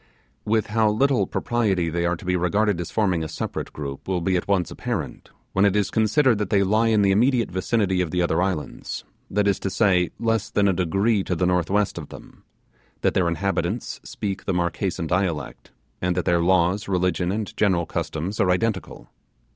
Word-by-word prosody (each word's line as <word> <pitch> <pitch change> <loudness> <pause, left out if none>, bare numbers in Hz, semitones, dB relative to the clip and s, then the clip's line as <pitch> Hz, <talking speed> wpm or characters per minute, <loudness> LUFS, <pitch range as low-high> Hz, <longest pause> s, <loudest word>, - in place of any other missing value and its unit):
With 110 0 +1
how 110 -1 +3
little 135 +5 +2
propriety 100 -8 0
they 85 +1 0
are 90 - +1
to 85 - -12
be 90 0 +1
regarded 90 +2 +1
as 85 - -5
forming 95 -7 +1
a - - -3
separate - - -5
group 70 -2 -7
will 95 -2 0
be 95 +2 0
at 90 - -1
once 95 -4 +1
apparent, - - -5 0.2
when 95 - +3
it 100 -1 +3
is 105 -2 +1
considered 110 +2 +3
that 105 -3 -2
they 100 0 +3
lie 110 +4 +2
in 110 -2 +3
the 100 - +4
immediate 120 +3 +2
vicinity 95 0 0
of 90 - -1
the 90 - -1
other 85 0 +1
islands, 95 -5 -3 0.3
that 105 +1 +1
is 100 - +2
to 95 - -2
say, 95 -3 +2
less 115 -2 0
than 100 -1 +2
a 95 - +3
degree 95 +4 +1
to 90 - -2
the 90 - 0
northwest 90 +2 +1
of 75 - -9
them; - - -13 0.6
that - - +2
their 90 -2 +2
inhabitants 95 +4 -2
speak 100 -2 -5
the 95 - 0
Marquesan 85 +1 -1
dialect, 85 -2 -2 0.3
and 90 0 0
that 90 - 0
their 85 -2 +2
laws, 90 +3 +2
religion, 90 -1 0
and 105 0 -4
general 95 -5 +2
customs 85 +5 -4
are 90 - +3
identical. 95 +1 -1
95 Hz, 195 wpm, -23 LUFS, 90-105 Hz, 0.6 s, the